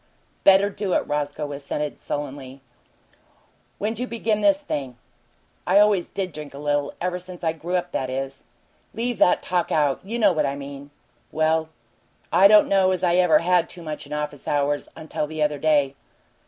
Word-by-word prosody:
"Better 195 +1 +5
do 200 -2 -2
it," - - +1
Roscoe 145 0 -3
assented, 145 +1 -4
sullenly. 140 -2 -6 1.2
"When'd 215 +2 -3
you 250 - -2
begin 220 -2 -1
this 295 -1 +4
thing?" 135 - -5 0.7
"I 185 +2 +4
always 205 -3 +4
did 190 -2 -4
drink 150 -2 -8
a - - -8
little. 145 0 -1
Ever 180 0 -2
since 180 0 -11
I 160 -1 +1
grew 170 +3 -4
up, 180 -1 -1
that 130 - -2
is." 135 +1 -5 0.5
"Leave 235 -1 -2
that 180 - +4
talk 180 -2 -1
out! 145 -3 +2
You 220 +5 -4
know 210 -4 +4
what 155 - +1
I 140 - -2
mean." 140 0 -9 0.4
"Well, 160 0 +1 0.6
I 195 - +8
don't 210 0 +6
know 195 -1 +3
as 185 -1 -1
I 175 0 +3
ever 180 -3 +5
had 180 -1 +3
too 175 - -10
much 155 -2 -6
in - - -16
office 150 -2 -4
hours 145 0 0
until 155 -1 -4
the 155 0 -2
other 150 -1 0
day." 145 -3 +2
160 Hz, 180 wpm, -23 LUFS, 145-190 Hz, 1.2 s, I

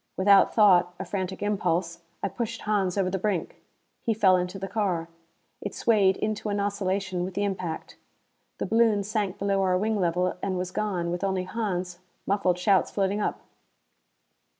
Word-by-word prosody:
Without 195 +1 +5
thought 180 -5 +5
a - - -5
frantic 190 0 -4
impulse 170 -4 -1 0.2
I - - +2
pushed 230 +1 -4
Hans 205 -3 0
over 185 -2 +1
the 190 - -1
brink. 190 -4 -2 0.4
He 225 - 0
fell 195 -4 +5
into 180 +1 -2
the 195 0 -5
car. 185 -5 -1 0.5
It 205 - -5
swayed 200 -4 +3
into 215 0 -2
an 205 0 -1
oscillation 195 -2 -1
with 185 0 -5
the 205 - 0
impact. 185 -5 -4 0.6
The - - -2
balloon 225 -3 +3
sank 205 -2 -2
below 195 0 0
our 185 -1 +2
wing 215 +2 0
level 180 0 +1
and 190 -2 -1
was 180 0 -3
gone, 180 -5 -2
with 175 +2 -3
only 190 -2 0
Hans, 185 -4 -3 0.3
muffled 190 -3 +1
shouts 190 +1 +3
floating 200 +1 0
up. - - -2
195 Hz, 170 wpm, -26 LUFS, 180-205 Hz, 0.6 s, Without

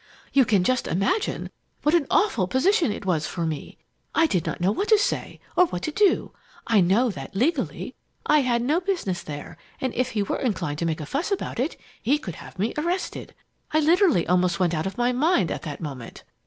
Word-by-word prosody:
"You 270 -2 +5
can 200 -5 +3
just 255 +5 +1
imagine 195 - -1 0.3
what 300 - +3
an 335 -5 +3
awful 235 - +2
position 320 - +2
it 205 - -6
was 165 -5 0
for 170 -2 -3
me! 155 -3 -5 0.4
I 325 - +5
did 185 - 0
not - - -3
know 180 +3 +2
what 395 - -1
to 435 - +6
say 410 - -2 0.2
or 360 - +5
what 180 - -5
to - - -1
do. 405 +4 +2 0.3
I 220 -4 +4
know 210 +8 +3
that, 135 -1 -9
legally, 265 +12 -1 0.3
I 300 0 +5
had 240 -3 +1
no 305 +8 +2
business 345 - -2
there, 145 -1 -8 0.2
and 260 -2 -2
if 255 +1 -1
he 210 -2 +1
were - - -2
inclined 175 - -2
to 170 - 0
make 160 -1 -2
a - - -5
fuss 295 - -2
about 395 - -2
it, 270 +6 -2 0.2
he 275 +6 +2
could 180 - -7
have - - -12
me 210 +5 -1
arrested. 350 +4 -3 0.4
I 310 - +4
literally 325 - +4
almost 180 -1 +2
went 175 -2 +2
out 160 +2 -1
of 195 - -6
my 245 +1 +2
mind 255 - +2
at - - -3
that 150 -2 -6
moment. 135 -7 -7
235 Hz, 215 wpm, -25 LUFS, -, 0.4 s, to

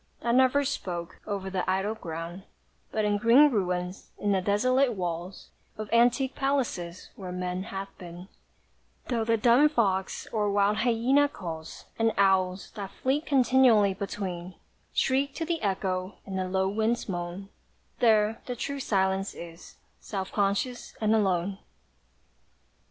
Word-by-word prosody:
That 235 - +1
never 260 +3 +4
spoke, 175 -8 -4
over 195 -2 -3
the 185 -1 -1
idle 195 +3 0
ground: 170 -2 -6 0.5
But 215 -1 0
in 205 0 +2
green 255 +7 +6
ruins, 180 -3 -2
in 205 - 0
the 190 -1 +2
desolate 255 +7 +2
walls 175 -1 -5 0.3
Of 215 0 -5
antique 245 +3 +3
palaces, 245 -11 -2
where 185 -3 -7
Man 180 0 -3
hath 195 0 -6
been, 175 +1 -9 0.8
Though 235 -3 +1
the 230 0 +2
dun 245 +7 +5
fox, 195 -9 0
or 210 -2 +1
wild 200 +1 +2
hyæna, 250 +5 +3
calls, 160 -3 -7
And 225 0 +3
owls, 190 -1 +2
that 200 -3 -6
flit 275 +9 -1
continually 250 -6 +4
between, 185 -2 -5 0.4
Shriek 270 +1 +1
to 325 - -2
the 330 0 -2
echo, 190 -1 -1
and 190 -1 -4
the 185 0 -2
low 190 0 +1
winds 220 +4 0
moan, 175 +1 -5 0.5
There 220 -2 +3
the 250 - -3
true 280 +3 -4
Silence 195 -4 0
is, 170 0 -10 0.2
self 190 -2 -5
conscious 205 +5 -1
and 215 0 +2
alone. 195 -2 +1
200 Hz, 140 wpm, -28 LUFS, 185-235 Hz, 0.8 s, green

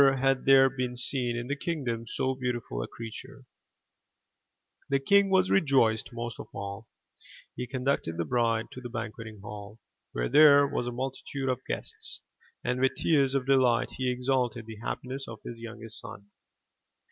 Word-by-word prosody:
Never 135 -1 +5
had 135 0 +1
there 135 0 +7
been 125 -2 -3
seen 125 -1 +1
in 120 - -3
the 140 +3 -2
kingdom 130 -8 -3
so 130 +3 -1
beautiful 120 - -3
a - - -4
creature. 130 +4 -9 1.4
The 140 - +3
king 200 +8 +4
was 190 -1 +3
rejoiced 130 - +3
most 120 -1 -5
of - - -7
all. 100 +2 -6 0.7
He 125 - -4
conducted 130 -10 -1
the 85 - -1
bride 115 +3 +1
to 130 - -9
the 120 - -6
banqueting 110 -2 -6
hall, 105 +1 -9 0.4
where - - -1
there 145 -2 +7
was 120 - -2
a - - -2
multitude 135 +2 -4
of 130 - -1
guests, - - -5 0.4
and 125 +1 -1
with 130 - +3
tears 140 -4 +2
of 135 -2 +1
delight 130 -3 +3
he 130 -1 -1
exalted 125 -2 0
the 110 -1 -9
happiness 130 +4 -4
of 110 -2 -9
his 115 -1 -7
youngest 115 -1 -7
son. 100 0 -10
125 Hz, 165 wpm, -29 LUFS, 115-135 Hz, 1.4 s, there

